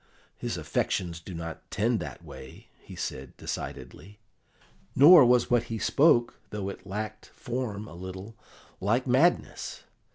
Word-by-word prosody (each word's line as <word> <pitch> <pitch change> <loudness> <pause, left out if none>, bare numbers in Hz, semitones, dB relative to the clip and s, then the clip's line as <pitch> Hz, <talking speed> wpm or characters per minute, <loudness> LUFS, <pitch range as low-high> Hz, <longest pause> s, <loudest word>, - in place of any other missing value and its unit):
His - - -4
affections 85 -3 -2
do 85 +2 -9
not 80 -1 -7
tend - - +1
that - - -7
way," 65 - -12
he - - -12
said 65 0 -6
decidedly. 100 +3 -7 0.8
"Nor 150 +1 +9
was 125 0 +3
what 120 -2 +3
he 115 - -4
spoke, 120 +2 +3
though 100 -2 -4
it 100 - -10
lacked 110 +2 -5
form 115 -5 -4
a - - -11
little, 95 +5 -8 0.4
like 115 +7 +1
madness. 135 +8 +1
110 Hz, 135 wpm, -28 LUFS, 95-125 Hz, 0.8 s, Nor